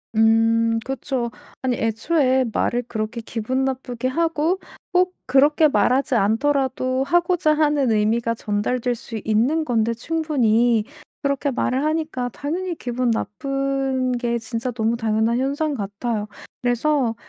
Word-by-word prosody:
음. 225 +1 +3
그쵸. 265 -2 -3 0.3
아니 255 -2 0
애초에 260 +4 +1
말을 245 +1 0
그렇게 220 +1 -4
기분 235 +4 -2
나쁘게 255 -2 -3
하고 330 +5 0 0.3
꼭 365 0 +2
그렇게 290 +4 +4
말하지 270 -1 +2
않더라도 260 +4 +1
하고자 345 -1 +2
하는 295 -5 +2
의미가 230 +2 +1
전달될 230 +4 -1
수 230 -2 -7
있는 245 +9 +1
건데, 230 -3 +1
충분히. 240 -6 +1 0.4
그렇게 280 0 0
말을 260 +2 0
하니까 310 -5 -1
당연히 345 +5 -3
기분 245 -3 -2
나쁜 270 +3 -1
게 235 -1 -1
진짜 230 +2 -3
너무 230 0 0
당연한 225 +1 +1
현상 285 +3 0
같아요. 210 0 -3 0.3
그래서 245 0 +1
255 Hz, 280 characters per minute, -22 LUFS, 230-285 Hz, 0.4 s, 그렇게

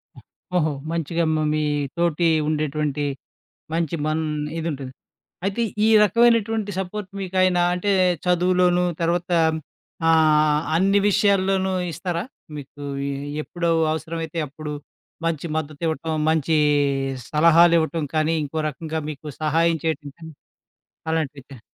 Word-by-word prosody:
హ్మ్, - - -15 0.3
ఓహో! 160 -3 +2 0.2
మంచిగా 170 0 -1
మ - - +1 0.2
మీ 155 0 0 0.3
తోటి 170 0 +2 0.2
ఉండేటువంటి 150 -1 -1 0.7
మంచి 165 -1 -1
మన్ 155 +1 0 0.4
ఇదుంటుంది. 140 -5 -4 0.5
అయితే, 200 +4 0 0.2
ఈ - - +4
రకమైనటువంటి 225 0 +3
సపోర్ట్ 190 +1 -4
మీకాయనా 185 -1 +2
అంటే, 200 +3 0 0.3
చదువులోనూ 180 0 +3 0.2
తర్వాత 175 +2 0 0.8
ఆహ్, 155 -2 +4 0.2
అన్ని 195 +3 +3
విషయాల్లోనూ 195 -2 +2 0.2
ఇస్తారా? 175 +1 -3 0.3
మీకూ 145 0 -9 0.2
ఎ - - -2 0.3
ఎప్పుడూ 170 +2 -3 0.2
అవసరమైతే 160 0 -4
అప్పుడు 150 +2 -7 0.5
మంచి 165 -1 -1
మద్దతివ్వటం, 160 +1 -3 0.2
మంచీ 160 0 +2 0.7
సలహాలివ్వటం 165 0 +4
కానీ, 155 +1 +2
ఇంకో 145 +3 -5
రకంగా 160 +1 -5
మీకు 155 0 -9 0.2
సహాయం 165 +2 +2
చేయటం 155 -3 -2
కానీ, 160 -1 -10 0.8
అలాంటివి 150 -4 -2
చే 130 -5 -11
165 Hz, 110 wpm, -23 LUFS, 155-180 Hz, 0.8 s, ఈ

